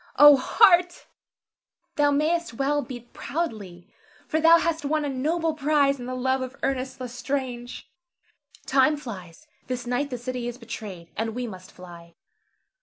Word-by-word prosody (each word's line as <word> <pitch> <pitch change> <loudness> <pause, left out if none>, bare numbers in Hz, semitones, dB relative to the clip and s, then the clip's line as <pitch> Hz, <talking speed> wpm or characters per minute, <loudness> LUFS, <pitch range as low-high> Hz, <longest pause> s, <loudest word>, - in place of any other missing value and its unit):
O 295 0 +9
heart! 350 - +4 0.9
thou 290 -1 +3
mayst 310 0 0
well 285 +3 +1
beat 245 -3 -10
proudly, 210 - -5 0.4
for 315 - 0
thou 330 +1 +8
hast 330 -2 -1
won 300 +1 0
a - - -2
noble 315 +5 -1
prize 285 -2 +2
in 245 - -7
the 255 - -4
love 260 +1 0
of 260 +1 -5
Ernest 260 -1 -2
L'Estrange. 250 -1 -5 0.8
Time 275 +3 +3
flies; 200 - -9 0.2
this 250 -1 -4
night 250 +4 -1
the 250 - -4
city 245 0 -4
is 240 0 -5
betrayed, 215 -7 -8
and 225 +1 -3
we 250 0 -3
must 185 -5 -10
fly. 170 -2 -13
260 Hz, 150 wpm, -25 LUFS, 240-295 Hz, 0.9 s, O